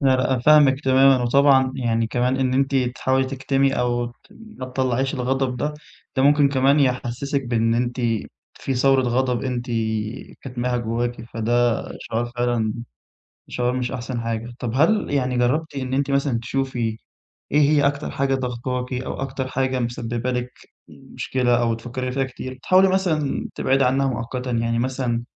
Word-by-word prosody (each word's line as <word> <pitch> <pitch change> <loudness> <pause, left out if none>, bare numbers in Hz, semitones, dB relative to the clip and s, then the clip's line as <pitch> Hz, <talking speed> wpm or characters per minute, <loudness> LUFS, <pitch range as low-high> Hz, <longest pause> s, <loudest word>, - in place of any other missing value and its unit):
لا 135 -2 +4
لأ 130 - 0
أنا 130 - +1
فاهمِك 145 -1 +5
تمامًا 130 -1 +5
وطبعًا 130 +1 +4
يعني 115 -2 0
كمان 125 +3 0
إن 130 -1 0
أنتِ 135 +1 +1
تحاولي 130 +1 +1
تكتمي 135 +1 0
أو 120 -1 0
ت 120 - -9 0.2
ما 220 - -10
تطلّعيش 130 +1 -1
الغضب 130 0 -1
ده، 150 +4 -2 0.4
ده 130 - +3
ممكن 145 0 +5
كمان 140 +2 +3
يحسسِك 130 +1 -1
بإن 115 -1 +1
أنتِ 120 +1 -1 0.5
في 135 - -3
ثورة 135 +1 +3
غضب 125 0 0
أنتِ 125 -2 -3 0.8
كتماها 125 -1 -2
جواكِ 120 +1 -2
فده 120 +1 +1 0.2
شعور 120 +1 -3
فعلًا 120 -3 0 0.7
شعور 125 0 -1
مش 125 0 -2
أحسن 120 -1 -4
حاجة، 115 +1 -4
طَب 120 -3 -3
هل 165 +9 +2
يعني 130 -3 0
جرّبتِ 145 +6 0
إن 130 -1 -3
أنتِ 140 +1 0
مثلًا 140 -3 +1
تشوفي 120 -3 -2 0.5
إيه 150 - +4
هي 145 -1 +4
أكتر 145 +1 -1
حاجة 135 0 0
ضغطاكِ 125 0 -3
أو 125 +1 -3
أكتر 130 -1 -3
حاجة 130 0 -1
مسبب 120 0 -3
لِك 125 0 -2 0.4
مشكلة 120 -2 -1
أو 115 -1 +1
بتفكري 125 +2 -5
فيها 135 0 0
كتير، 130 0 -8
تحاولي 190 +1 +5
مثلًا 175 -7 0
تبعدي 135 0 +2
عنها 135 +2 +2
مؤقتًا 125 +1 -3
يعني 115 0 0
مثلًا، 125 -2 -1
130 Hz, 160 wpm, -22 LUFS, 120-135 Hz, 0.8 s, فاهمِك